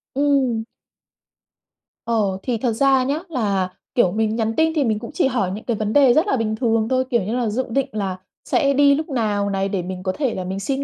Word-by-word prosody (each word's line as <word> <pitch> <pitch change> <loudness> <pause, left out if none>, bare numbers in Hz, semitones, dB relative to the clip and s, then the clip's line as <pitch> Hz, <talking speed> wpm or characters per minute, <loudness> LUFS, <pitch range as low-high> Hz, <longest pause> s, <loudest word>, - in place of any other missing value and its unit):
Ừm. 270 -5 +1 1.4
Ờ, 210 -5 0
thì 245 -3 -1
thật 230 0 -1
ra 270 +2 +3
nhá 280 +4 -1
là, 200 - 0 0.3
kiểu, 185 -8 +3
mình 220 0 0
nhắn 225 -1 0
tin 320 0 +2
thì 300 - +2
mình 220 -4 0
cũng 235 +4 -8
chỉ 280 - +2
hỏi 215 -8 -1
những 210 +3 -6
cái 235 -3 -1
vấn 215 0 -2
đề 275 -4 +6
rất 315 +9 +2
là 270 - +1
bình 220 -1 -1
thường 225 -2 +1
thôi, 260 0 +1
kiểu 235 -6 +1
như 220 +5 -2
là, 240 -3 0
dự 255 +5 -1
định 270 +3 0
là 195 -3 -3 0.3
sẽ 280 -4 +2
đi 280 0 +5
lúc 310 +3 -4
nào 210 -6 0
này, 195 0 -1
để 195 -3 -1
mình 185 +1 -6
có 185 - 0
thể 265 +1 -1
là 185 - -3
mình 190 +2 -4
xin 270 +7 -2
230 Hz, 240 wpm, -21 LUFS, 205-270 Hz, 1.4 s, đề